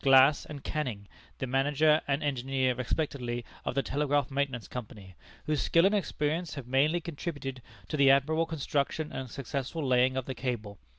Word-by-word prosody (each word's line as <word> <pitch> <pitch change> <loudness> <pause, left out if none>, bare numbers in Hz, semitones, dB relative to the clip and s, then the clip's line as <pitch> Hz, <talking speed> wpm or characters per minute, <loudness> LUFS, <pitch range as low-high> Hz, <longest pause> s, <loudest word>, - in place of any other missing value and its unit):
Glass 135 +1 +6
and 145 -3 -8
Canning, 120 -10 -3 0.3
the - - -2
manager 145 +4 +3
and 140 +2 0
engineer 135 -2 0
respectively 125 -2 -2 0.2
of - - -3
the 135 - +2
Telegraph 145 -1 0
Maintenance 135 -4 -1
Company, 105 -6 -8 0.3
whose 150 -2 0
skill 170 +2 +4
and 200 - +4
experience 165 -4 -1
have 140 -4 -6
mainly 140 +7 +2
contributed 145 -6 -5 0.3
to 155 - -3
the 140 -1 +6
admirable 155 +4 +3
construction 150 0 -1
and 130 -1 -5
successful 140 +4 -4
laying 130 0 +3
of 130 - -1
the 135 - -4
cable. 110 -7 -4
135 Hz, 165 wpm, -30 LUFS, 125-150 Hz, 0.3 s, Glass